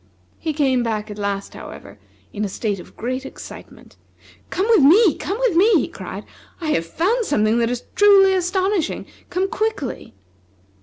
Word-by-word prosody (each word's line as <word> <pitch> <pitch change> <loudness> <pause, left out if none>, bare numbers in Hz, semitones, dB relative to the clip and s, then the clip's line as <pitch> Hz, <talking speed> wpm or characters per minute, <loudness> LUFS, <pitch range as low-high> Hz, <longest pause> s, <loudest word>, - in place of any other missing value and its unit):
He 315 - -2
came 270 -4 +1
back 215 -2 -3
at 210 - -8
last, 200 -1 -3
however, - - -11 0.3
in 210 - -3
a 205 - -2
state 205 0 -3
of - - -14
great 255 +3 -3
excitement. 270 - -12 0.5
"Come 380 - -1
with 450 -8 +6
me! 355 +7 +6
come 395 - -4
with - - +1
me!" 410 +7 +5
he - - -3
cried. - - -8 0.3
"I 325 -3 -3
have 165 - 0
found 400 - 0
something 220 - +1
that 230 -1 +1
is 245 0 -3
truly 395 -1 +6
astonishing! 375 0 0 0.2
Come 370 +2 0
quickly!" 410 - -3
310 Hz, 165 wpm, -21 LUFS, -, 0.5 s, with